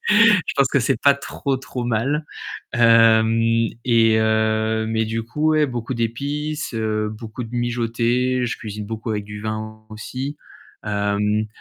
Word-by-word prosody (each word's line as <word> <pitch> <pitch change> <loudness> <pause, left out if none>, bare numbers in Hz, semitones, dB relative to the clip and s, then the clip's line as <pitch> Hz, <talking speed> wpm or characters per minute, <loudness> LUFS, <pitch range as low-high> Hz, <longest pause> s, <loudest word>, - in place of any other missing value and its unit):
Je 210 -3 +5
pense 140 -2 +4
que 140 - +2
c'est 110 - 0
pas 140 - +6
trop, 140 -1 -3
trop 130 -1 -6
mal. 130 +7 0 0.5
Hem 115 -1 +4 0.2
et 115 -2 +4
heu 110 0 +1
mais 110 0 0
du 115 +1 -3
coup, 150 +7 0
ouais, 155 -1 +3
beaucoup 120 -1 -4
d'épices, 145 +7 -3
heu, 110 -1 -1
beaucoup 110 +2 -7
de 110 - -10
mijoté, 120 +1 0
je - - -3
cuisine 105 -2 -6
beaucoup 110 +1 -5
avec 105 -1 -2
du 105 0 -8
vin 110 0 -5
aussi. 130 +6 -5 0.5
Hem, 105 +1 0
115 Hz, 150 wpm, -21 LUFS, 110-130 Hz, 0.5 s, pas